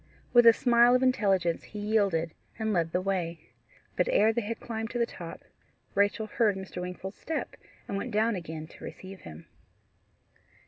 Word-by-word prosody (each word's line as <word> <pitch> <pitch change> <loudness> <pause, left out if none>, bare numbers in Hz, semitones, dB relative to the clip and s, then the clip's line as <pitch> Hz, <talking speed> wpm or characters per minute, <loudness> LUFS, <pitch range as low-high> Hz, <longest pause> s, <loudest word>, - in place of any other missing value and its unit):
With 240 -1 +7
a - - +12
smile 240 +1 +5
of 255 - +2
intelligence 195 -9 +2
he 210 - -9
yielded 200 -6 +1 0.2
and 220 -1 -1
led 165 -3 +1
the 180 - 0
way. 170 -8 -3 0.4
But 180 - +1
ere 220 +2 +4
they 235 - 0
had 225 +2 -4
climbed 225 -1 -4
to 240 - -4
the 235 - +2
top, 170 -7 -9 0.5
Rachel 205 +2 +2
heard 215 -1 +1
Mr. 190 -1 -6
Wingfold's 180 +2 -6
step, 320 - -4 0.3
and 200 - -2
went 225 - -3
down 220 0 +2
again 160 -3 -6
to - - -15
receive 190 0 -9
him. 80 +1 -11
200 Hz, 175 wpm, -29 LUFS, 180-225 Hz, 0.5 s, a